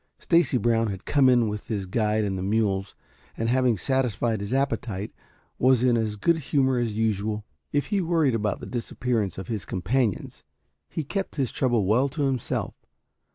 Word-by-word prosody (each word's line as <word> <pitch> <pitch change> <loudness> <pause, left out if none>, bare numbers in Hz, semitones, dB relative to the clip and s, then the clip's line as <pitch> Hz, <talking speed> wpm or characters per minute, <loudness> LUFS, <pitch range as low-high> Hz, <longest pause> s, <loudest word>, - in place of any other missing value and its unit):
Stacy 165 -7 +3
Brown 115 -1 +2
had 95 -3 -5
come 140 -3 +4
in 120 -3 +4
with 105 0 -5
his 100 -4 -2
guide 105 +2 0
and 100 -2 -1
the 95 - -3
mules, 100 -1 0 0.4
and 115 +1 -1
having 125 -2 +2
satisfied 120 -2 0
his 100 +2 -5
appetite, 125 -7 -1 0.5
was 130 -1 +4
in 125 -2 +4
as 110 -2 0
good 170 +10 +2
humor 135 -3 +1
as 115 -3 -2
usual. 105 -1 -1 0.3
If 145 0 +1
he 200 - +2
worried 165 -6 +2
about 105 -3 -1
the - - -6
disappearance 120 -3 -2
of 95 -1 -6
his 110 -5 -3
companions, 105 +4 -1 0.5
he 160 - -3
kept 195 +7 -4
his 135 -5 -1
trouble 120 -6 +1
well 120 +8 +3
to 145 +1 -3
himself. 135 -4 -1
115 Hz, 175 wpm, -25 LUFS, 105-130 Hz, 0.5 s, come